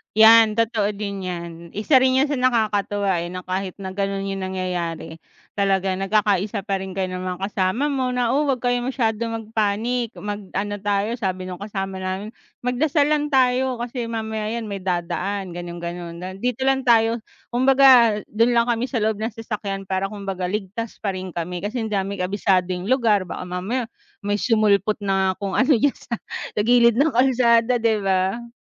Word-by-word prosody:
'Yan 220 Hz, 0 st, +7 dB
totoo 220 Hz, -2 st, +1 dB
din 200 Hz, -1 st, -5 dB
'yan, 170 Hz, -1 st, -5 dB, 0.2 s
isa 215 Hz, +8 st, +2 dB
rin 260 Hz, 0 st, +3 dB
'yun -, -, +4 dB
sa 290 Hz, -, -1 dB
nakakatuwa, 205 Hz, -6 st, +1 dB
eh, 170 Hz, -, -3 dB
na 185 Hz, 0 st, -6 dB
kahit 185 Hz, 0 st, -3 dB
na 190 Hz, -1 st, -5 dB
gano'n 195 Hz, 0 st, -1 dB
'yung 195 Hz, 0 st, -3 dB
nangyayari 180 Hz, -3 st, -4 dB, 0.4 s
talagang 195 Hz, -1 st, +1 dB
nagkakaisa 205 Hz, 0 st, +1 dB
pa 195 Hz, -1 st, -1 dB
rin 190 Hz, 0 st, -6 dB
kayo 190 Hz, -1 st, -1 dB
ng 185 Hz, -, -4 dB, 0.2 s
mga -, -, -16 dB
kasama 190 Hz, +10 st, 0 dB
mo 260 Hz, -2 st, 0 dB
na, 245 Hz, -2 st, +1 dB
"oh 290 Hz, +3 st, +1 dB
huwag 265 Hz, -2 st, +1 dB
kayo 245 Hz, 0 st, +2 dB
masyado 240 Hz, -4 st, -1 dB
mag 225 Hz, -1 st, -5 dB
panic, 225 Hz, +3 st, 0 dB
mag 205 Hz, 0 st, -4 dB, 0.2 s
ano 205 Hz, +1 st, -2 dB
tayo," 205 Hz, +3 st, 0 dB
sabi 185 Hz, -3 st, -2 dB
nung 180 Hz, -1 st, -7 dB
kasama 195 Hz, -2 st, -4 dB
namin, 190 Hz, +3 st, -4 dB, 0.3 s
"magdasal 285 Hz, +4 st, +2 dB
lang 295 Hz, -1 st, +1 dB
tayo 260 Hz, -2 st, +2 dB
kasi 240 Hz, 0 st, -4 dB
mamaya 220 Hz, -2 st, -3 dB
'yan, 230 Hz, -2 st, -4 dB
may 200 Hz, -, -4 dB
dadaan" 185 Hz, +2 st, -2 dB
gano'n 175 Hz, 0 st, -7 dB
gano'n 170 Hz, 0 st, -5 dB, 0.2 s
"dito 250 Hz, +3 st, -1 dB
lang 265 Hz, 0 st, +2 dB
tayo." 230 Hz, 0 st, +4 dB, 0.3 s
Kumbaga 255 Hz, -3 st, +6 dB
dun 230 Hz, +3 st, +2 dB
lang 235 Hz, 0 st, +3 dB
kami 235 Hz, +2 st, -1 dB
sa 255 Hz, -3 st, -2 dB
loob 215 Hz, -1 st, 0 dB
ng 220 Hz, +2 st, -2 dB
sasakyan 210 Hz, -3 st, -4 dB
para 190 Hz, +1 st, -1 dB
kumbaga 195 Hz, -3 st, -4 dB
ligtas 210 Hz, +3 st, -4 dB
pa 200 Hz, -, 0 dB
rin 185 Hz, 0 st, -6 dB
kami 175 Hz, +1 st, -3 dB
kasi 215 Hz, +5 st, -3 dB
di -, -, -9 dB
namin 195 Hz, -1 st, -1 dB
kabisado 185 Hz, -1 st, +1 dB
'yung 180 Hz, +1 st, -4 dB
lugar 220 Hz, -7 st, +2 dB
baka 180 Hz, -, -5 dB
mamaya 190 Hz, +8 st, -2 dB, 0.4 s
may 205 Hz, 0 st, 0 dB
sumulpot 215 Hz, -3 st, +2 dB
na 190 Hz, -1 st, +1 dB
kung 195 Hz, -1 st, -2 dB
ano 265 Hz, +2 st, +5 dB
diyan 280 Hz, +5 st, +3 dB
sa 235 Hz, -, -5 dB, 0.5 s
gilid 235 Hz, 0 st, +5 dB
ng 305 Hz, +3 st, +4 dB
kalsada 245 Hz, -1 st, +4 dB
'di 225 Hz, -2 st, +2 dB
ba. 195 Hz, +4 st, 0 dB
210 Hz, 180 wpm, -22 LUFS, 190-235 Hz, 0.5 s, Yan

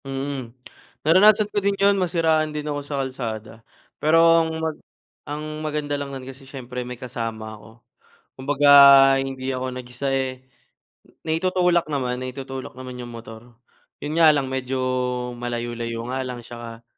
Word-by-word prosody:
Mm. 135 Hz, -2 st, -4 dB, 0.6 s
Naranasan 205 Hz, +6 st, +6 dB
ko 205 Hz, -, +1 dB
din 200 Hz, 0 st, 0 dB
'yun, 200 Hz, 0 st, +4 dB
nasiraan 160 Hz, -3 st, +2 dB
din 150 Hz, 0 st, -4 dB
ako 145 Hz, -1 st, -3 dB
sa 145 Hz, -1 st, -4 dB
kalsada 115 Hz, -4 st, -5 dB, 0.5 s
pero 155 Hz, +2 st, +4 dB, 0.2 s
ang 160 Hz, -, -1 dB
mag 160 Hz, -1 st, -3 dB, 0.5 s
ang 155 Hz, +1 st, -5 dB
maganda 150 Hz, -1 st, -3 dB
lang 140 Hz, -1 st, -3 dB
nun 135 Hz, -2 st, -7 dB
kasi 135 Hz, +1 st, -12 dB
siyempre 125 Hz, -2 st, -6 dB
may 125 Hz, 0 st, -7 dB
kasama 115 Hz, -3 st, -5 dB
ako. 110 Hz, 0 st, -13 dB, 0.7 s
Kumbaga 145 Hz, +2 st, +3 dB, 0.5 s
hindi 135 Hz, -1 st, -4 dB
ako 130 Hz, 0 st, -3 dB
nag-isa, 125 Hz, +2 st, -5 dB
eh, 130 Hz, -1 st, -2 dB, 0.8 s
naitutulak 175 Hz, +1 st, +2 dB
naman, 130 Hz, -3 st, -2 dB
naitutulak 130 Hz, 0 st, -6 dB
naman 130 Hz, -1 st, -8 dB
'yung 120 Hz, -, -8 dB
motor. 115 Hz, 0 st, -11 dB, 0.4 s
'Yun 155 Hz, +3 st, -2 dB
nga 160 Hz, -, +8 dB
lang 140 Hz, -2 st, 0 dB
medyo 130 Hz, 0 st, -3 dB, 0.6 s
malayo-layo 120 Hz, -1 st, -4 dB
nga 130 Hz, -, -1 dB
lang 125 Hz, -1 st, -5 dB
'tsaka 115 Hz, -1 st, -9 dB
135 Hz, 145 wpm, -23 LUFS, 125-155 Hz, 0.8 s, nga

